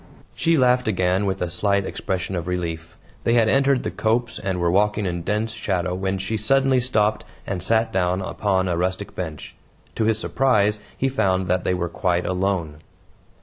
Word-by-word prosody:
She 165 0 +2
laughed 125 -2 +3
again 95 -1 +1
with 95 -1 -1
a 90 - -2
slight 100 +2 +1
expression 95 -1 -3
of 85 -1 -4
relief. 85 -2 -4 0.3
They 115 - +2
had 115 -2 +4
entered 135 +2 +3
the - - -3
copse 115 +2 -1
and 95 -2 -2
were 85 -1 +1
walking 105 +2 +2
in 85 -1 -2
dense 105 +5 -1
shadow 95 -5 -2
when 95 +1 -2
she 95 +4 -2
suddenly 135 +4 +3
stopped 110 -4 +1 0.2
and 95 -3 -3
sat 110 +3 +1
down 90 0 +1
upon 95 0 0
a 85 - 0
rustic 95 +3 -2
bench. 80 -5 -6 0.4
To 110 - 0
his 110 -1 +2
surprise 105 -4 +1 0.2
he 135 - +1
found 95 -8 +1
that 90 0 +1
they 90 - +1
were 85 -1 -2
quite 90 +1 -1
alone. 90 -5 -1
95 Hz, 185 wpm, -23 LUFS, 90-110 Hz, 0.4 s, had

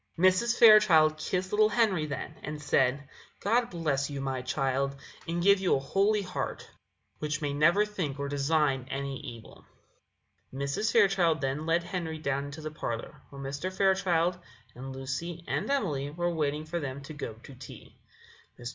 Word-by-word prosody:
Mrs. 185 +7 +3
Fairchild 200 -9 +7
kissed 185 +3 -2
little 215 0 +4
Henry 200 -10 +1
then, 140 +1 -5
and 150 0 -6
said: 140 -1 +1 0.3
"God 235 +4 +1
bless 150 -5 -1
you, 140 -1 -5
my 135 -1 -2
child, 135 +1 -1 0.3
and 170 +1 -1
give 200 +1 +5
you 190 -2 +2
a - - 0
holy 200 +9 +1
heart, 180 -1 -5 0.5
which 150 0 -2
may 145 -2 -2
never 170 +8 +4
think 180 -10 -4
or 140 0 -3
design 140 -2 +1
any 135 -1 -4
evil." 120 -7 -11 0.9
Mrs. 140 +11 -1
Fairchild 190 -7 +3
then 135 +4 -2
led 170 +1 +2
Henry 170 -3 -4
down 140 -2 -2
into 145 +2 -8
the 155 0 -5
parlour, 115 -6 -5
where 140 -1 -9
Mr. 140 +7 -4
Fairchild 185 -2 +2 0.3
and 130 +2 -8
Lucy 140 +6 -5
and - - -2
Emily 155 - 0
were 175 +3 -2
waiting 150 -1 -1
for 170 +2 -3
them 140 -2 -5
to 140 +3 -9
go 145 -6 -5
to 115 +5 -14
tea. 130 +1 -12 0.6
Mr. 120 0 -5
155 Hz, 165 wpm, -29 LUFS, 140-185 Hz, 0.9 s, Fairchild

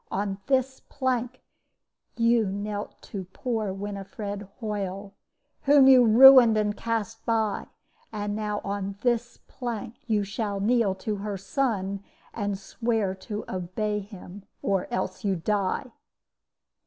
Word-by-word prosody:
On 195 0 -2
this 265 -1 +1
plank 255 -2 -2 0.7
you 230 -2 +3
knelt 205 +1 -4
to 195 -3 -6
poor 225 -6 -2
Winifred 200 +1 -6
Hoyle, 200 -3 -4 0.5
whom 280 -1 +7
you 260 -2 +8
ruined 240 0 +9
and 210 -1 +1
cast 225 -1 -3
by; 220 -3 0 0.4
and 205 -1 -3
now 210 -1 -2
on 200 0 -3
this 240 -1 0
plank 240 -2 -5
you 215 -3 +2
shall 205 0 -3
kneel 215 -2 +2
to 210 +2 -3
her 200 0 -4
son 200 -3 -1 0.3
and 205 -3 -2
swear 220 0 -1
to 210 +2 -6
obey 190 +4 -2
him 200 -1 -10 0.2
or 195 -2 0
else 240 - -3
you 195 -2 +1
die!' 200 +7 -1
210 Hz, 125 wpm, -26 LUFS, 200-235 Hz, 0.7 s, ruined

